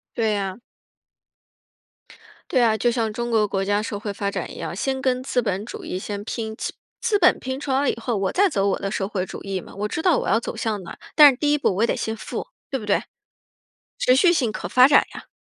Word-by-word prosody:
对 220 -2 +1
呀。 195 +1 -3 1.9
对 255 - +3
啊， 220 -2 +3
就 240 +3 +2
像 230 -3 -1
中 240 +2 -3
国 215 -2 +3
国 195 -1 -1
家 205 +1 +1
社 205 -2 -4
会 205 -1 -4
发 200 0 -2
展 190 -3 -4
一 - - -11
样， 165 0 -5
先 265 +6 -2
跟 255 -1 0
资 250 -1 0
本 200 -2 -2
主 - - -8
义 185 - -3
先 205 +1 -5
拼， 220 -1 -4
资 - - -4 0.3
资 460 -3 +2
本 360 -3 +4
拼 260 +1 -4
出 290 -2 -4
了 275 +1 +2
以 - - 0
后 235 0 -2
我 195 -1 0
再 400 +2 +4
走 200 -6 0
我 - - -1
的 195 - -3
社 195 -2 -1
会 190 -3 -2
主 - - -8
义 195 -1 -3
嘛， - - -13
我 210 +2 -2
知 320 - -3
道 345 -4 +3
我 - - -4
要 225 - +3
走 - - -6
向 210 -4 -2
哪， - - -9 0.2
但 295 -2 +9
是 250 - -7
第 290 0 +1
1 295 - +3
步 240 -9 +1
我 220 - +2
也 - - +3
得 - - 0
先 220 - -3
富， - - -6 0.2
对 270 - -2
不 210 - -8
对？ 200 - +2 1.0
持 255 - +4
续 345 +6 +5
性 245 -9 +1
可 - - -5
发 255 +1 +6
展 290 - +5
呀。 - - -10
225 Hz, 270 characters per minute, -23 LUFS, 200-260 Hz, 1.9 s, 但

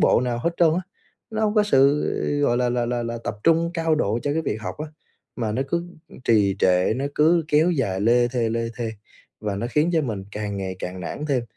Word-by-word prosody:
bộ - - +4
nào 120 -1 -1
hết 170 +8 0
trơn 170 -2 +5
á, 180 - 0 0.5
nó 220 0 -3
hông 210 -1 +1
có 210 - +5
sự, 140 -7 +4 0.4
gọi 120 -4 +2
là, 125 0 +1
là 120 -1 0
là 120 0 -1
là 115 0 -4
tập 105 - -3
trung 165 0 +3
cao 165 -1 +1
độ 115 -7 0
cho 145 - 0
cái 160 +2 0
việc 135 - -2
học - - -5
á, 155 - -4 0.5
mà 110 -3 -2
nó 130 - 0
cứ 170 +3 -2 0.4
trì 100 -4 +3
trệ, 90 +2 +3
nó 135 - -2
cứ 165 +2 +4
kéo 155 +4 +4
dài 115 - -1
lê 120 +3 +3
thê, 120 -2 0
lê 115 +1 -1
thê, 115 -2 -3 0.5
và 105 -2 -2
nó 115 - -2
khiến 150 +6 +2
cho 160 -2 +2
mình 110 -8 -4
càng 105 -1 -4
ngày 95 -1 -4
càng 90 +1 -6
nản 120 - -5
thêm. 135 -5 +1
125 Hz, 240 wpm, -23 LUFS, 110-155 Hz, 0.5 s, trơn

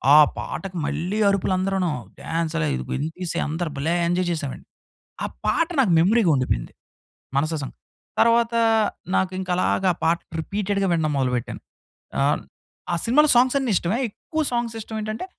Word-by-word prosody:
ఆ - - +10 0.2
పాటకి 190 -2 -5
మళ్ళీ 180 +8 -2
అరుపులు 195 -1 +1
అందరును. 190 -2 0 0.3
డాన్స్ 165 0 -2
అయి 160 +5 -3 0.2
అందరు 165 +2 -2
భలే 155 +5 0
ఎంజాయ్ 175 +1 +1
చేసాం 155 -5 -2
అండి. - - -15 0.6
ఆ - - +1 0.2
పాట 330 - +2
నాకు 220 -10 +3
మెమరీగా 195 +3 +4
ఉండిపోయింది. 130 - -1 0.7
మనసా 155 +3 +1
సాంగ్. 135 - -7 0.4
తరువాత 235 0 +4 0.6
నాకు 190 -1 +1
ఇంకా 185 -1 -3
అలాగా 185 0 +2
పాట 165 +1 +3 0.2
రిపీటెడ్‌గా 200 +2 -1
వినడం 160 -2 +1
మొదలు 130 -2 +1
పెట్టాను. 120 - -4 0.6
ఆహ్, - - +2 0.5
ఆ - - +2
సినిమాలో 300 +6 +4
సాంగ్స్ 255 +2 +4
అన్ని 265 -3 -1
ఇష్టమే. 180 +7 0
ఎక్కువ 315 +9 -3
సాంగ్స్ 235 -1 -1
ఇష్టం 220 +1 -7
ఏంటంటే 215 +7 -4
185 Hz, 150 wpm, -23 LUFS, 160-220 Hz, 0.7 s, ఆ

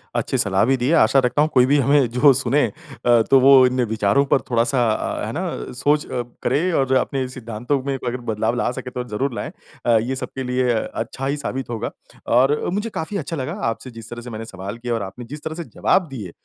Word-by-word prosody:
अच्छी - - 0
सलाह 95 -1 +2
भी 135 +3 +3
दी 125 +1 -1
है। 165 - +3
आशा 135 - +5
रखता 135 +4 +1
हूँ, 155 - +3
कोई 125 -2 +6
भी 140 +3 +3
हमें 140 -1 +4
जो 135 +3 +6
सुने 145 +2 +2
अ, 135 -7 0
तो 135 - +8
वो 135 0 +7
इन 125 0 +1
विचारों 110 +5 +2
पर - - +3
थोड़ा-सा 120 +1 +2
अ, - - -2
है - - -4
ना, - - -4
सोच 145 +4 +1
अ, 125 -2 -3 0.2
करे 155 +9 +1
और 130 -1 +1
अपने 130 0 0
सिद्धांतों 125 +2 -3
में 140 0 -2
अगर 125 -1 -3
बदलाव 110 +3 0
ला 125 - 0
सके 125 - -6
तो 125 - -4
ज़रूर 130 +4 -1
लाएँ - - -4 0.3
अ, 115 -2 +5
ये 120 +4 -1
सबके 130 0 -5
लिए 125 -1 +1
अच्छा 115 +3 -4
ही 140 +2 -1
साबित 135 -3 -4
होगा। 115 -2 -3 0.5
और 135 +4 +4
मुझे 210 +3 -2
काफ़ी 200 +6 -3
अच्छा 165 0 -4
लगा 130 -3 -3 0.2
आपसे 125 +3 -6
जिस 115 -1 -11
तरह 120 0 -7
से 125 - -9
मैंने 110 0 -6
सवाल 95 +2 -7
किए 120 0 -5
और 115 -3 -1
आपने 100 +6 -8
जिस 145 +5 -9
तरह 160 0 -4
से 170 - -5
जवाब 185 +2 +1
दिए 110 -10 -7
130 Hz, 235 wpm, -21 LUFS, 115-140 Hz, 0.5 s, तो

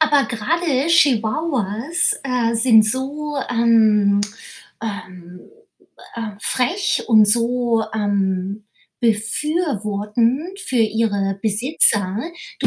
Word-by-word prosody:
Aber 295 -3 +3
gerade 280 +4 -1
Chihuahuas, 270 - +1
äh, 245 -3 -1
sind 225 -1 +5
so, 280 +6 -3
ähm, 220 -4 +3 0.6
ähm, 185 -4 -8 0.7
äh, 225 -3 -6
frech 305 - -1
und 215 -3 +6
so, 235 +1 +1
ähm, 200 -1 -2 0.4
befürwortend 230 - -1
für 320 - -6
ihre 210 -4 0
Besitzer. 210 -3 +2 0.4
Du - - 0
230 Hz, 85 wpm, -19 LUFS, 210-265 Hz, 0.7 s, und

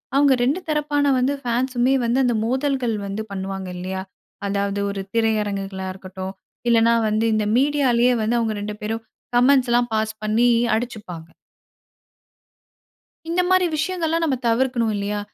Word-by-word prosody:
அவுங்க 280 -1 +5
2 285 +9 +1
தரப்பான 290 -1 +1
வந்து 275 +3 +1
ஃபேன்ஸுமே 250 +1 +1
வந்து 245 +3 +2
அந்த 240 -2 +2
மோதல்கள் 260 -2 0
வந்து 205 +2 -4
பண்ணுவாங்க, 195 -1 -4
இல்லையா. 190 +1 -4 0.5
அதாவது 200 0 -1
ஒரு 195 -1 -4
திரையரங்குகளா 200 -4 -1
இருக்கட்டும், 190 0 -7 0.4
இல்லனா 230 0 +4
வந்து 215 +2 +1
இந்த 215 -1 +1
மீடியாலயே 255 -4 +3
வந்து 235 +2 +1
அவங்க 220 -2 -1
2 210 0 -4
பேரும் 225 +1 -3 0.3
கமெண்ட்ஸ்லாம் 245 -2 +3
பாஸ் 220 0 -1
பண்ணி 225 +3 +3 0.3
அடிச்சுப்பாங்க. 205 -8 -6 2.0
இந்த 345 +2 +1
மாரி 370 -1 +4
விஷயங்கள்லாம் 330 0 -1
நம்ம 275 -5 +1
தவிர்க்கணும் 235 -2 +1
இல்லையா. 205 +1 -2
230 Hz, 130 wpm, -22 LUFS, 205-265 Hz, 2.0 s, அவுங்க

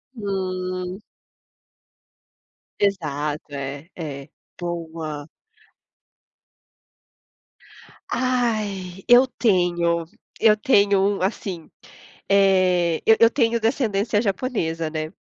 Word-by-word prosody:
Uhum. 185 -2 -3 1.8
Exato, 150 -7 -1
é 140 +3 -6
é. 140 -5 -7 0.3
Boa. 160 -4 -5 2.8
Ai, 215 -7 -1
eu 245 +2 +7
tenho! 175 -8 +1 0.3
Eu 215 -1 +5
tenho 200 -4 +3
assim, 185 -3 -3 0.6
eh, 185 -4 +3
eu 225 - +6
eu 230 0 +7
tenho 235 -3 +1
descendência 220 -3 0
japonesa, 190 -7 -2
né. 155 0 -4
185 Hz, 70 wpm, -23 LUFS, 165-210 Hz, 2.8 s, eu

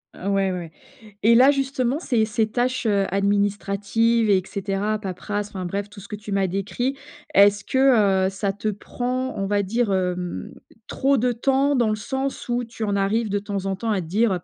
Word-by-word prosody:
Ouais, - - -12
ouais, 195 -1 +1
ouais. 170 -3 -6 0.5
Et 230 +2 +5
là, 260 +4 +7
justement, 270 0 -1
ces 240 -9 +1
ces 215 0 0
tâches, 250 +2 -1
heu, 200 -3 +2
administratives 205 +3 +1
et 190 -2 +4
cetera, 200 +1 -2
paperasse, 205 +1 -4
enfin 185 -3 -5
bref, 200 +3 -3
tout 205 - -12
ce 200 - -11
que 210 - -5
tu 210 0 -9
m'as 195 -1 +1
décrit, 205 +8 -2 0.4
est-ce 200 0 +5
que, 215 -8 +3
heu, 190 - +2
ça 195 0 -2
te 215 +2 -2
prend, 250 +5 -3
on 195 - -1
va 205 0 +1
dire, 225 +2 0
hem, 180 - -2 0.3
trop 275 0 +1
de 245 +2 +1
temps? 270 +4 +2
Dans 235 -4 +2
le 215 - +1
sens 265 +6 -4
où 240 +1 0
tu 230 -1 -7
en 205 -1 0
arrives, 210 +3 +1
de 205 0 0
temps 200 -1 -4
en 195 - -1
temps, 225 +4 -2
à 195 -3 0
te 160 - -8
dire: 200 0 +1
205 Hz, 205 wpm, -23 LUFS, 195-240 Hz, 0.5 s, là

